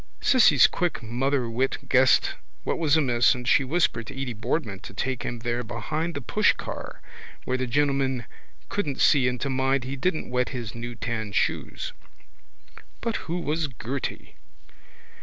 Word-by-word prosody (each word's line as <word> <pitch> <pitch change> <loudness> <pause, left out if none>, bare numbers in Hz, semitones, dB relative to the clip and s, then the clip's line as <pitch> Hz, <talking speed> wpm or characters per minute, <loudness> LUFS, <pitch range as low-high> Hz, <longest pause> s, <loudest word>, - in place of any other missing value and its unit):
Cissy's 180 - +6
quick 175 -8 0
motherwit 125 +1 -1
guessed 130 0 +4 0.3
what - - -1
was 160 -2 +3
amiss 125 -4 +4
and 125 -1 -6
she 135 - +5
whispered 130 -5 0
to 135 - -8
Edy 130 -3 -3
Boardman 115 - -2
to 95 - -11
take 130 +2 -2
him 120 - -4
there 120 +1 -2
behind 150 +9 -3
the 140 - -3
pushcar 120 - -1 0.4
where 130 - 0
the 130 0 -1
gentleman 135 -2 +1 0.4
couldn't 150 -10 -2
see 135 -4 +5
and 125 0 -1
to 140 - -1
mind 130 0 +1
he 130 +2 -4
didn't 155 -1 -1
wet 125 0 +1
his 120 -6 -5
new 120 +1 -6
tan 110 -4 -3
shoes. - - -1 1.1
But 230 -2 -1
who 175 +1 -1
was 155 0 -1
Gerty? 130 +1 -5
130 Hz, 155 wpm, -26 LUFS, 120-145 Hz, 1.1 s, Cissy's